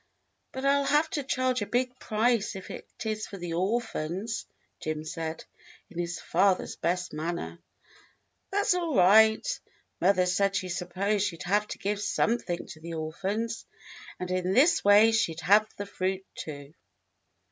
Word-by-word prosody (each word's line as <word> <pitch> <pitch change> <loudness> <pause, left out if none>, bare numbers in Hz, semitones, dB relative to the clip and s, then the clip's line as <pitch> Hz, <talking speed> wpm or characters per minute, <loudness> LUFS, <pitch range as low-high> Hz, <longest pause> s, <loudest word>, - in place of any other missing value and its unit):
"But 265 +1 -5
I'll 280 0 +3
have 300 +3 +2
to 295 - -1
charge 255 -2 0
a 205 - -2
big 250 +1 -1
price 220 -1 +1
if 190 - -8
it - - -8 0.2
is 215 -1 -2
for 200 - -8
the 175 -2 -5
orphans," 200 0 -2 0.3
Jim 155 -1 -3
said, 160 0 -5 0.5
in 175 - -7
his 175 0 -3
father's 185 +2 +1
best 180 +2 -1
manner. 170 +2 -4 0.9
"That's 405 0 +2
all 340 -5 -1
right. 220 +4 +6 0.5
Mother 185 0 +4
said 195 +2 +1
she 185 -2 -1
supposed 190 +4 0
she 170 -4 -5
'd - - -7
have 205 +4 +1
to - - -6
give 205 +1 -2
something 210 -5 0
to 155 - -11
the 165 +1 -6
orphans, 195 +9 -3 0.5
and 180 0 -4
in 185 0 0
this 290 - +5
way 205 +2 +7
she'd 175 -7 0
have 210 +4 +5
the 205 - -4
fruit, 190 -1 -2
too." 145 -1 -8
200 Hz, 160 wpm, -28 LUFS, 175-225 Hz, 0.9 s, way